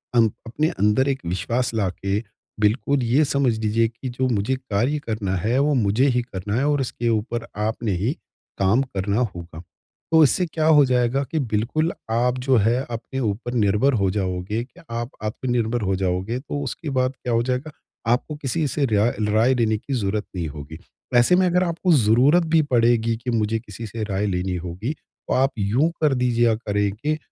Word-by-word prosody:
अन 115 -2 +6 0.2
अपने 150 +7 0
अंदर 105 +7 +2
एक 135 -1 -1
विश्वास 115 +8 -1
लाके 100 -1 -1 0.4
बिल्कुल 125 +6 +1
ये 125 +6 +3
समझ 135 -5 +1
लीजिए 110 +1 +2
कि 120 +3 -7
जो 130 +1 -1
मुझे 115 +3 0
कार्य 130 +3 -1
करना 105 -4 -1
है 120 +4 +2
वो 145 +1 +2
मुझे 115 +2 +2
ही 125 - +3
करना 105 -3 -5
है। 135 - +1
और 145 -2 +2
इसके 120 -1 -2
ऊपर 115 +1 -1 0.2
आपने 110 -1 -2
ही 110 +10 0 0.5
काम 100 +7 +3
करना 100 -4 -2 0.2
होगा। 85 -1 -9 0.5
तो 160 -1 +7
इससे 180 +6 +3
क्या 160 -1 -2
हो 150 -2 +7
जाएगा 125 +1 +1
कि 160 - 0
बिल्कुल 125 +7 0 0.2
आप 125 +2 +1
जो 130 - +5
है 115 +5 +2
अपने 115 +3 -5
ऊपर 115 +1 -2
निर्भर 110 +4 +2
हो 95 - +2
जाओगे 95 +2 -2
कि 125 0 -17
आप 120 +2 -3
आत्मनिर्भर 120 +1 -1
हो 95 -1 0
जाओगे 95 +5 -1
तो 145 +1 -5
उसके 145 +3 -5
बाद 130 0 +2
क्या 120 - -1
हो 115 0 +2
जाएगा 130 +4 -2 0.4
आपको 135 +5 0
किसी 150 +2 -1
से 145 +1 0
रेयाय 110 0 +2 0.2
राय 110 +5 +3
लेने 110 -3 +1
की 135 +6 -6
ज़रूरत 105 -2 -1
नहीं 85 -3 -2
होगी। 75 +1 -8 0.4
ऐसे 120 +9 +5
में 185 +1 +3
अगर 180 +1 +2
आपको 175 +1 0
ज़रूरत 130 +8 +4
भी 160 - +6
पड़ेगी 115 -1 +3
कि 125 +2 -6
मुझे 110 0 0
किसी 115 0 -9
से 110 +1 -5
राय 100 -1 -1
लेनी 90 -1 -1
होगी, 90 - -4
तो - - -8
आप 135 +2 +3
यूँ 115 +11 +2
कर 150 -3 +3
दीजिए 125 -2 +2
या 110 - +3
करें 105 -2 -1
के 150 +8 -2
115 Hz, 190 wpm, -23 LUFS, 105-130 Hz, 0.5 s, तो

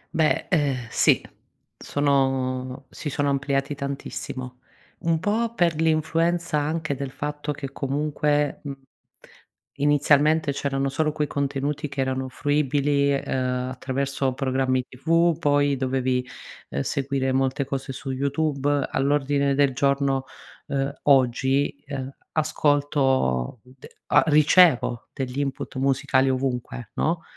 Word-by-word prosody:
Beh, 155 -1 +2
uhm, 145 -6 +2 0.2
sì, - - +3 0.5
sono 135 -2 0
si 150 - -5
sono 145 0 0
ampliati 140 +1 0
tantissimo. 135 -2 -6 0.4
Un 165 -1 +1
po' 230 +5 -1
per 170 -3 +1
l'influenza 165 +1 +1
anche 155 0 -1
del 140 0 -4
fatto 145 +2 -4
che 140 -1 -6
comunque 145 +1 0
mhmm, 140 -2 -5 1.0
inizialmente 145 +1 +3
c'erano 135 0 -1
solo 155 +2 0
quei 150 - 0
contenuti 140 +1 -2
che 140 - -3
erano 130 0 -2
fruibili, 145 +1 +1
uhm, 130 -2 -1
attraverso 135 +1 -2
programmi 130 -1 0
TV, 165 +5 +1
poi 145 -2 +2
dovevi, 130 -1 0 0.5
uhm, 70 - -2
seguire 135 - -1
molte 135 +2 0
cose 135 0 -4
su 135 +1 -6
YouTube. 140 +1 0
All'ordine 140 0 +1
del 140 -1 +3
giorno 140 0 +1 0.4
uhm, 140 0 -1
oggi, 135 0 +2
uhm, 135 -2 -5 0.2
ascolto, 140 - +1
d 130 +1 -15 0.3
a - - +7
ricevo 150 -5 +4
degli 130 -1 -4
input 135 -2 -3
musicali 135 0 +2
ovunque, 125 -3 -3
no, 165 +1 0
140 Hz, 115 wpm, -24 LUFS, 130-145 Hz, 1.0 s, a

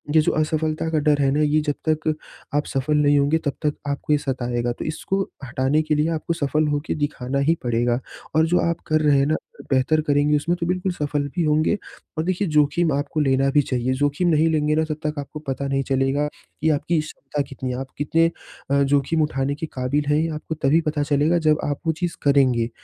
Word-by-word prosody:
ये 160 - +7
जो - - +1
असफ़लता 155 +1 0
का 160 -1 +1
डर 145 -1 +2
है 135 -1 +3
ना, 150 +2 +1
ये 150 +1 +3
जब 150 -1 -1
तक 155 0 +1 0.4
आप 150 - +1
सफ़ल 145 +3 0
नहीं 145 -1 +4
होंगे 145 +3 +3
तब 145 - 0
तक 150 - +2
आपको 140 +1 -1
ये - - +5
सताएगा, 120 -3 -2
तो 120 - -6
इसको 185 +5 -2 0.2
हटाने 130 +4 +1
के 155 -1 0
लिए 150 +1 +2
आपको 170 - -2
सफ़ल 155 -1 0
हो 145 0 +1
के - - -1
दिखाना 140 -3 -2
ही 165 - +4
पड़ेगा 120 0 +1 0.4
और 160 0 +5
जो 175 +2 +2
आप 170 - -2
कर 155 0 +2
रहे 145 -2 +4
हैं 135 - +3
ना 155 +2 +1
अ, - - -11
बेहतर 135 +4 +3
करेंगे 145 0 +2
उसमें 170 +4 0
तो 170 - -1
बिल्कुल 185 +1 0
सफ़ल 145 -3 -2
भी 175 - +1
होंगे। 155 +6 +2 0.4
और 155 - 0
देखिए, 185 +3 0
जोख़िम 150 +2 +2
आपको 145 +2 -2
लेना 135 -1 +2
भी 145 +1 +4
चाहिए, 125 0 0
जोख़िम 145 +6 0
नहीं 160 0 +3
लेंगे 150 -1 +1
ना 160 - +2
तब 155 -1 -4
तक 150 -1 -1
आपको 145 +2 -7
पता 140 -2 -4
नहीं 135 0 0
चलेगा, 135 +2 +1 0.3
कि 160 - +3
आपकी 155 +2 +1
क्षमता 150 -1 -5
कितनी 130 -1 -5
है, 125 - -3
आप 135 - -5
कितने 165 +3 +2 0.5
अ, 140 0 +4
जोख़िम 145 +3 +1
उठाने 140 -2 0
के 155 - -4
क़ाबिल 135 +3 -1
हैं? 150 0 +3
ये 165 - 0
आपको 160 +1 -5
तभी 155 +2 +2
पता 150 -1 -1
चलेगा 150 +4 +2
जब 155 0 +4
आप 145 -1 -2
वो 160 - +3
चीज़ 175 -1 -1
करेंगे। 130 -5 +3
150 Hz, 230 wpm, -22 LUFS, 140-155 Hz, 0.5 s, ये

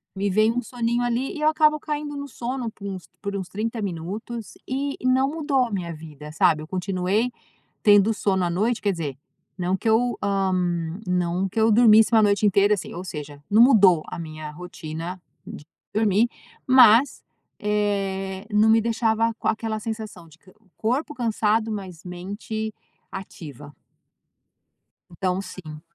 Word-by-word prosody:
me 200 +1 -1
vem 215 +3 +3
um 245 +1 -1
soninho 240 0 -1
ali 245 +4 -1
e - - -6
eu 305 - +3
acabo 305 -1 +3
caindo 295 -1 -4
no 280 0 -5
sono 245 0 -4
por 200 - -12
uns 190 -3 -6
por 200 -1 -4
uns 190 -2 -5
30 225 +3 -3
minutos 205 +5 -5
e 275 +2 -2
e - - -8
não 260 +1 +3
mudou 290 -5 +1
a 235 - -8
minha 175 -4 -3
vida, 150 -2 -10
sabe. 155 -1 +3
Eu - - -10
continuei 190 +5 -1 0.5
tendo 205 +1 +5
sono 190 -2 0
à 175 - 0
noite, 215 +7 0
quer 200 -1 +1
dizer, 150 -6 -4 0.4
não 180 +1 0
que 225 - -3
eu, 240 +2 +2
ah, 195 -2 +1 0.5
não 180 +1 0
que 210 +4 -2
eu 220 0 +4
dormisse 220 0 +6
1 220 - +6
noite 205 0 +3
inteira, 200 +1 +4
assim, 190 - -6
ou 180 - -6
seja, 145 -4 -8
não 215 +3 +5
mudou 200 - +6
a - - -6
minha 155 -1 -7
rotina 170 +1 -7 0.3
de - - -9 0.3
dormir, 215 +1 +3 0.4
mas, 255 0 +6 0.4
eh, 195 -2 -1
não 215 +1 +4
me 225 - +5
deixava 225 0 +1
com - - -2
aquela 220 0 -1
sensação 215 -6 -6
de 160 +1 -19 0.4
corpo 265 +7 -1
cansado, 225 -2 0
mas 185 -5 -7
mente 205 +5 -5 0.4
ativa. 150 -6 -9 1.4
Então, 180 +1 -1
sim. 170 -5 -9
205 Hz, 160 wpm, -24 LUFS, 180-230 Hz, 1.4 s, dormisse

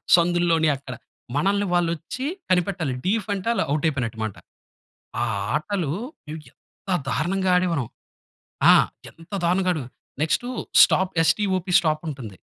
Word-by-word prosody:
సందుల్లోని 170 -2 +2
అక్కడ. 135 -1 -9 0.4
మనల్ని 200 +6 +1
వాళ్ళు 175 -1 +2
వచ్చి 175 - -6 0.2
కనిపెట్టాలి. 175 -5 0
డీఫ్ 205 +2 0
అంటే 195 +1 -5
ఆళ్ళు 235 - +1
ఔట్ 150 +1 -1
అయిపోయినట్టు 125 -7 -2
అనమాట. 110 -3 -3 0.8
ఆ - - +2 0.3
ఆటలు 170 0 -1 0.4
మేం 155 +1 -5
ఎంత 195 - -14 0.2
దారుణంగా 180 +9 0
ఆడేవారం. 170 -8 0 0.8
ఆ! - - +9 0.4
ఎంత 165 +1 -18
దారుణంగా 185 +2 +2
ఆడే 155 - -3 0.4
నెక్స్ట్ 160 +9 +1 0.4
స్టాప్ 190 0 +3
ఎస్-టి-ఓ-పీ 185 0 +1
స్టాప్ 155 -3 0
ఉంటుంది. 125 -10 -7
170 Hz, 130 wpm, -23 LUFS, 150-185 Hz, 0.8 s, ఆ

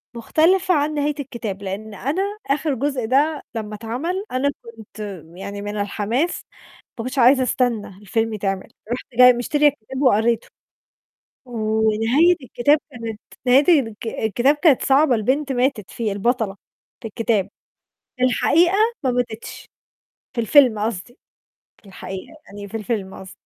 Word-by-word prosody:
مُختلفة 355 +10 +2
عن 300 -1 +1
نهاية 295 0 0
الكتاب. 230 -8 -5
لإن 205 +3 -6
أنا 280 - -2 0.3
آخر 290 +1 0
جُزء 270 -2 -2
ده 285 +5 +1
لما 210 -1 -4
اتعمل 295 - -3
أنا 260 +3 +1
كنت 225 -3 -13 0.4
يعني 200 +2 -7
من 205 +1 -5
الحماس 215 - -1 0.5
ماكنتش 255 +3 -3
عايزة 255 +2 +6
أستنى 245 -4 0
الفيلم 225 +2 -1
يتعمل. 195 -2 -3 0.2
رُحت 245 - -3
جاية 250 +1 +8
مشترية 295 +5 +2
الكتاب 265 -1 -3
وقريته. 235 -3 +2 1.0
ونهاية 225 +7 +2
الكتاب 275 +4 +2
كانت 230 -3 -6 0.3
نهاية 285 +6 +6
الك 225 -3 -6
الكتاب 240 +6 +1
كانت 295 -4 +4
صعبة، 275 -1 +4
البنت 270 +6 0
ماتت 250 -5 -1
فيه، 220 -3 -2
البطلة 210 0 0 0.5
في 230 - -5
الكتاب. 220 -2 0 0.7
في 255 - +1
الحقيقة 335 +8 +3 0.3
ما 260 - +2
ماتتش، 245 -2 -4 0.7
في 235 - 0
الفيلم 245 -2 +5
قصدي. 220 +2 -4 0.7
في 205 - -17
الحقيقة، 190 +7 -8
يعني 200 0 -9
في 225 - -5
الفيلم 210 -3 -3
قصدي. 190 0 -10
240 Hz, 135 wpm, -21 LUFS, 215-280 Hz, 1.0 s, جاية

